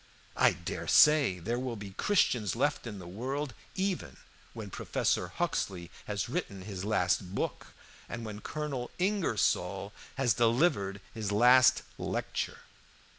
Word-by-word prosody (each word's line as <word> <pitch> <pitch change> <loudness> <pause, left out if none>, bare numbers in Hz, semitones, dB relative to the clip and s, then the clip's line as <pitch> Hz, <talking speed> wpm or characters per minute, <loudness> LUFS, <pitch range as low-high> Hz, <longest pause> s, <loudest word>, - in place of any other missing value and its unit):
I - - +5
dare - - -5
say 150 -11 +6
there 115 +8 -2
will 125 -2 -3
be 100 -2 -8
Christians 115 - +1
left 140 +1 0
in 105 -3 -6
the 90 - -9
world 130 +9 -4 0.2
even 190 -1 -2 0.4
when - - -7
Professor - - 0
Huxley 85 -3 -2
has - - -2
written 95 -2 -4
his 95 -2 -6
last 95 -2 0
book, - - -3 0.4
and 120 -1 -5
when 105 -1 -7
Colonel 145 -4 -4
Ingersoll 105 - 0 0.2
has 130 -5 +2
delivered 115 - +2
his 105 -2 -3
last 125 +4 +6 0.2
lecture. - - -3
115 Hz, 130 wpm, -31 LUFS, 100-135 Hz, 0.4 s, say